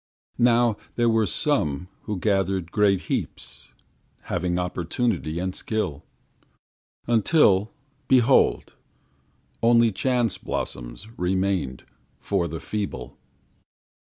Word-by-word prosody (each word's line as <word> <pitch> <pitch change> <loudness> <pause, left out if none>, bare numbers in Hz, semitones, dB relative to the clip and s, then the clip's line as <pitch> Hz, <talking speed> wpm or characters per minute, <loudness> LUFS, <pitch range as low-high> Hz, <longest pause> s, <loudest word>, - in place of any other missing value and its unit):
Now 120 -2 +4 0.2
there 120 -1 +3
were 110 -2 +2
some 90 - 0 0.2
Who 105 - -3
gathered 95 -3 0
great 100 -3 +3
heaps - - -5 0.6
Having 90 0 -1
opportunity 90 0 -2
and 90 +1 -2
skill 105 -10 -3 1.0
Until, 110 - +3 0.4
behold, 130 0 +3 0.9
only 115 0 +5
chance 120 +3 0
blossoms - - -5
Remained 90 -7 -1 0.3
for 95 -4 -1
the 80 0 -5
feeble. 100 - -5
100 Hz, 90 wpm, -24 LUFS, 90-115 Hz, 1.0 s, only